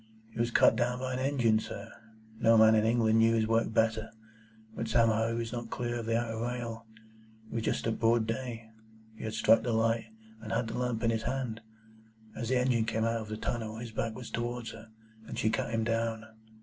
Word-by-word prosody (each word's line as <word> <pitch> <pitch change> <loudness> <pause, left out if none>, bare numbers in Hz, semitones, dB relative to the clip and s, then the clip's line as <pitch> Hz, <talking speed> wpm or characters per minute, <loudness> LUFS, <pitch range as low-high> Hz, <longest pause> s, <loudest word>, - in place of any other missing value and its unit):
"He 115 - -9
was 120 0 +2
cut 115 - +5
down 125 +1 0
by 130 0 -3
an 125 - -2
engine, 125 -5 +2
sir. - - -7 0.5
No 115 0 +5
man 110 0 +7
in 110 0 +3
England 115 -1 +3
knew 115 0 +4
his 110 -1 +2
work 115 0 +1
better. 110 0 +1 0.7
But 115 - -3
somehow 115 -1 +3
he 115 - -1
was 115 0 -3
not 120 -1 -5
clear 120 0 -3
of 115 - -6
the 115 0 +2
outer 115 -2 -3
rail. 115 -1 -4 0.6
It - - -8
was 115 - -1
just - - -1
at 115 -1 -1
broad 115 0 +3
day. 115 -1 -5 0.4
He - - -8
had 110 - -3
struck 115 - +5
the 120 - -1
light, 115 0 +1 0.4
and 110 - -7
had 115 - 0
the - - -5
lamp 125 -2 -1
in 115 - +3
his 110 -1 -1
hand. 120 -3 -3 0.7
As 115 -1 -4
the 130 - +3
engine 125 -3 +2
came 110 0 0
out 115 0 0
of 110 - -8
the 110 - -4
tunnel, 110 -1 -3
his 115 0 -7
back 110 0 -2
was 125 -2 -8
towards 120 0 -3
her, 110 0 -12 0.4
and - - -6
she 110 - +1
cut 115 - -1
him 115 -1 0
down. 115 -1 -1
115 Hz, 225 wpm, -30 LUFS, 110-120 Hz, 0.7 s, man